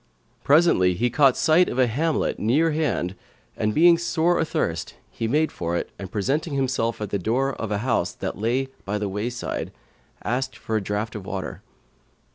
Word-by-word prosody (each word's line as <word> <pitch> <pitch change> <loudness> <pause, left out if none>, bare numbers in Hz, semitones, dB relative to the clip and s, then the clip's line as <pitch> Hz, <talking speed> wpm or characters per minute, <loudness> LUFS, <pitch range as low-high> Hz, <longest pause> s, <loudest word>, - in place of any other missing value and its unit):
Presently, 140 - +4
he 120 +5 0
caught 135 -1 +4
sight 165 +3 +4
of - - -4
a 130 - +5
hamlet 150 +7 0
near 150 +10 +2
hand 150 - -1 0.4
and 105 - 0
being 170 +6 +5
sore 170 0 +1
athirst, 85 - -2 0.2
he 115 - -3
made 155 +6 +2
for 85 0 -2
it - - -4
and 95 -1 -7
presenting 140 - -1
himself 130 -4 0
at 105 - -4
the 100 - 0
door 130 +8 0
of 115 - -5
a 105 - +1
house 110 -8 +1
that - - -4
lay 125 +5 0
by 105 +1 -2
the 105 -1 -2
wayside, 110 +5 -3 0.5
asked 130 +2 -2
for 110 - -4
a 110 - +1
draught 105 +3 -3
of 100 -4 -7
water. 95 -1 -5
120 Hz, 180 wpm, -24 LUFS, 105-150 Hz, 0.5 s, a